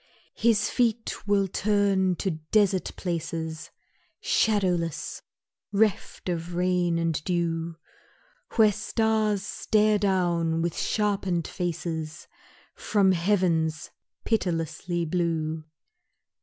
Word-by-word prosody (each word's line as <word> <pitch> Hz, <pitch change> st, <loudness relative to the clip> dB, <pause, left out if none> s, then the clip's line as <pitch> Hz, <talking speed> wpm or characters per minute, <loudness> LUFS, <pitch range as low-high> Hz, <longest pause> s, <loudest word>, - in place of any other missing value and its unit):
His 220 Hz, -2 st, +2 dB
feet 235 Hz, -2 st, 0 dB
will 200 Hz, -1 st, +3 dB
turn 195 Hz, -1 st, +2 dB
to 190 Hz, +2 st, -1 dB, 0.2 s
desert 200 Hz, -3 st, +3 dB
places 160 Hz, -2 st, -4 dB, 0.5 s
Shadowless, 180 Hz, -7 st, 0 dB, 0.5 s
reft 210 Hz, -1 st, 0 dB
of 170 Hz, 0 st, -3 dB
rain 180 Hz, -1 st, +1 dB
and 165 Hz, -2 st, -1 dB
dew, 170 Hz, -2 st, -1 dB, 0.8 s
Where 215 Hz, -2 st, +6 dB
stars 215 Hz, -1 st, 0 dB
stare 215 Hz, 0 st, +2 dB
down 175 Hz, -4 st, +1 dB
with 170 Hz, -1 st, -1 dB
sharpened 195 Hz, -5 st, 0 dB
faces 165 Hz, -2 st, -4 dB, 0.5 s
From 200 Hz, -3 st, +2 dB
heavens 170 Hz, -4 st, +1 dB, 0.3 s
pitilessly 175 Hz, -4 st, -1 dB
blue. 160 Hz, -2 st, -1 dB
180 Hz, 90 wpm, -26 LUFS, 165-205 Hz, 0.8 s, Where